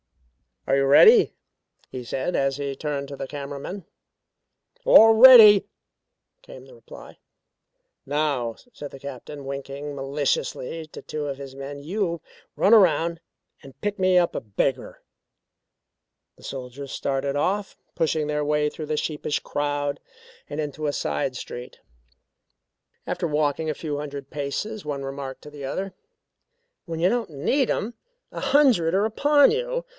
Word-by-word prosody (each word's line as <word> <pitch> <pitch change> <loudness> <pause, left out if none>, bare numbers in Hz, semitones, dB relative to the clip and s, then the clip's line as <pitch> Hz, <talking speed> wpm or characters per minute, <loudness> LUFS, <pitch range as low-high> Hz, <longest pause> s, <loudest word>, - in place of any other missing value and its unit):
"Are 135 - +3
you 135 - +2
ready?" 435 - +6 0.6
he 125 - -6
said 130 +8 -3
as 135 0 0
he 140 -1 -4
turned 140 -1 -4
to 140 - -7
the 135 0 -6
camera 140 0 -6
men. 185 +5 -7 1.0
"All 225 - +8
ready," 220 -4 +9 0.8
came - - -13
the - - -16
reply. - - -14 0.9
"Now," 140 -5 -1 0.2
said 145 -8 -8
the 135 - -11
Captain 140 +1 -9
winking 140 +1 -6
maliciously 140 +2 -2
to - - -11
two 150 -1 -5
of 140 -1 -4
his 135 -1 -9
men. 140 +1 -7
"You 170 +2 -3 0.3
run 200 - +3
around 170 -5 +4 0.4
and 135 -1 -15
pick 205 -1 -3
me 185 -1 +3
up 175 -1 +2
a - - -1
beggar." 120 +5 -3 1.4
The - - -19
soldiers 135 +1 -7
started 140 0 -2
off, 195 +7 -1 0.2
pushing 160 -1 0
their 150 0 -1
way 150 0 +1
through 155 0 -8
the 155 0 -2
sheepish 150 -1 -2
crowd 145 -1 -2 0.5
and 145 +1 -5
into 150 0 -3
a 145 - -1
side 75 - -2
street. 125 0 -8 1.3
After - - -2
walking 150 +1 0
a 155 - -2
few 150 -2 -4
hundred 140 -2 -7
paces 150 +9 -4
one 140 -2 -4
remarked 135 -1 -6
to 150 - -11
the 145 -2 -8
other: 190 +8 -4 0.9
"When 165 -3 -5
you 175 +2 +3
don't 235 -3 -1
need 165 - 0
them, 225 +3 -2 0.4
a - - -6
hundred 240 - +3
are 200 +2 +2
upon 285 - +4
you. - - -2
150 Hz, 150 wpm, -24 LUFS, 140-185 Hz, 1.4 s, ready